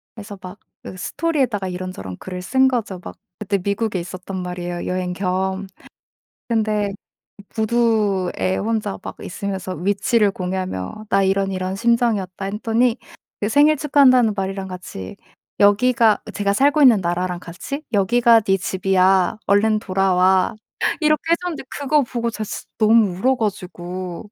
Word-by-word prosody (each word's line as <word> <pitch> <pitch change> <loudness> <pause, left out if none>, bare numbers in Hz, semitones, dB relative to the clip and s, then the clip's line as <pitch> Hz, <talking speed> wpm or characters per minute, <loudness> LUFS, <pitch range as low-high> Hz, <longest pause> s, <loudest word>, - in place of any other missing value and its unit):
그래서 205 -2 -9
막 185 +2 -10 0.2
그 - - -8
스토리에다가 260 - -1
이런저런 180 - -6
글을 180 -1 -7
쓴 265 +5 +3
거죠. 205 -8 -3
막 - - -9 0.2
그때 200 -1 -1
미국에 200 +1 -1
있었단 185 +2 -7
말이에요, 175 -1 -5
여행 180 0 -2
겸. 190 +1 -2 0.8
근데 215 -3 0 0.6
부두에 215 -5 +1
혼자 210 -2 -2
막 - - -7
있으면서 190 0 -4
위치를 200 +4 +1
공유하며 185 - -4
"나 195 -1 +3
이런 195 0 +1
이런 185 0 -3
심정이었다." 210 -4 0
했더니 225 +4 +1 0.4
그 210 - -1
"생일 295 +4 +4
축하한다."는 260 -6 +4
말이랑 195 0 -3
같이 180 - -8 0.4
여기가 220 +2 +4
제가 200 -1 0
살고 285 +7 +3
있는 235 -8 +6
나라랑 175 +1 -2
같이 190 - -7
"여기가 230 +3 +4
네 195 -1 +1
집이야. 190 +1 +2
얼른 215 +2 +3
돌아와." 190 +1 +2 0.5
이렇게 305 -1 +3
해 - - +6
줬는데 350 -6 -4 0.2
그거 285 +1 +2
보고 235 -1 -3
제가 220 - -4
진짜 - - -6
너무 215 -4 +4
울어 260 +5 +3
가지고. 185 -2 -5
200 Hz, 320 characters per minute, -21 LUFS, 185-230 Hz, 0.8 s, 있는